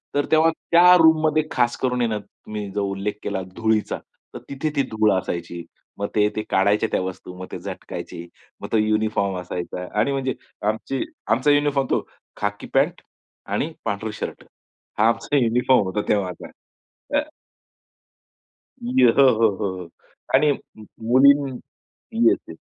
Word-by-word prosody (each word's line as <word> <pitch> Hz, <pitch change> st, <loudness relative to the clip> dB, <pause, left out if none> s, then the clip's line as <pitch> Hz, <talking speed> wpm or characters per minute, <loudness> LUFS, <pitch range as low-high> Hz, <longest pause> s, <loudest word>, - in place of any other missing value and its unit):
तर 145 Hz, -, +2 dB
तेव्हा 160 Hz, +1 st, +5 dB, 0.2 s
त्या 175 Hz, +1 st, +8 dB
रूममध्ये 155 Hz, -2 st, +4 dB
खास 120 Hz, -2 st, +1 dB
करून 125 Hz, -1 st, 0 dB
आहे 120 Hz, -, +2 dB
ना 110 Hz, -, -1 dB
तुम्ही 105 Hz, 0 st, -8 dB
जो 100 Hz, -, -1 dB
उल्लेख 100 Hz, +2 st, -2 dB
केला 100 Hz, -2 st, -2 dB
धुळीचा 110 Hz, -1 st, 0 dB, 0.4 s
तर -, -, -7 dB
तिथे 140 Hz, +3 st, -2 dB
ती 140 Hz, -, +3 dB
धूळ 110 Hz, -1 st, +3 dB
असायची. 85 Hz, -2 st, -3 dB, 0.4 s
मग 100 Hz, -, -1 dB
ते 105 Hz, -1 st, +4 dB
ते 110 Hz, -, -1 dB
काढायच्या 100 Hz, +3 st, +2 dB
त्या -, -, +1 dB
वस्तू, 95 Hz, -1 st, -6 dB
मग 95 Hz, -, -6 dB
ते -, -, -5 dB
झटकायची, 85 Hz, +1 st, -7 dB, 0.3 s
मग -, -, -5 dB
तो 115 Hz, -, +3 dB
युनिफॉर्म 105 Hz, -3 st, +1 dB
असायचा. 90 Hz, 0 st, -5 dB
आणि 140 Hz, -, +2 dB
म्हणजे 135 Hz, -1 st, -1 dB, 0.4 s
आमची 125 Hz, +4 st, -2 dB, 0.2 s
आमचा 140 Hz, +5 st, +3 dB
युनिफॉर्म 145 Hz, -2 st, +2 dB
तो -, -, +1 dB, 0.3 s
खाकी 105 Hz, 0 st, -3 dB
पॅट -, -, +2 dB, 0.5 s
आणि -, -, -1 dB
पांढर 105 Hz, +2 st, -2 dB
शर्ट -, -, -6 dB, 0.6 s
हा 110 Hz, -, +5 dB
आमचा 115 Hz, +5 st, +1 dB
युनिफॉर्म 125 Hz, -1 st, +3 dB
होता 95 Hz, +3 st, -1 dB
तेव्हाचा 95 Hz, -4 st, -1 dB, 0.7 s
अ, -, -, +3 dB, 1.6 s
य 125 Hz, +1 st, +3 dB
हो, -, -, +7 dB
हो, 115 Hz, -1 st, +4 dB
हो, 100 Hz, -, -1 dB
हो 90 Hz, -2 st, -8 dB, 0.5 s
आणि 145 Hz, +2 st, +4 dB, 0.3 s
मुलीं 130 Hz, +6 st, +3 dB, 0.8 s
येस 370 Hz, -, +5 dB
येस. -, -, -9 dB
110 Hz, 150 wpm, -23 LUFS, 100-135 Hz, 1.6 s, त्या